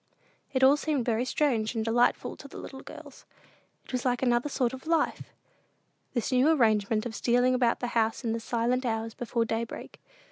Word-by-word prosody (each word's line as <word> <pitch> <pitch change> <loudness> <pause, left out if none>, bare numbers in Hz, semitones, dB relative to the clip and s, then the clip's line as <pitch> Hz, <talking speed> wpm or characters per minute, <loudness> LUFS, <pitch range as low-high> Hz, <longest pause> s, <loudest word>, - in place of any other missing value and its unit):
It 265 -1 +1
all 275 +2 +7
seemed 295 -5 -1
very 235 +1 +1
strange 240 -6 0
and 220 -1 -1
delightful 240 +2 +1
to 280 - -11
the - - -11
little 265 - -8
girls. - - -12 0.6
It - - -12
was 250 -2 -2
like 245 0 0
another 245 +2 +2
sort 255 -3 0
of 260 +4 -9
life, 330 -2 0 0.8
this 240 - -1
new 255 +4 +4
arrangement 220 -6 +2
of 240 - -4
stealing 245 +4 +2
about 245 -2 +1
the 245 - -2
house 225 +2 +1
in 225 -2 -1
the 230 - -2
silent 240 +2 0
hours 225 -2 -2
before 235 -1 -1
daybreak. 225 +1 -5
245 Hz, 185 wpm, -28 LUFS, 225-260 Hz, 0.8 s, all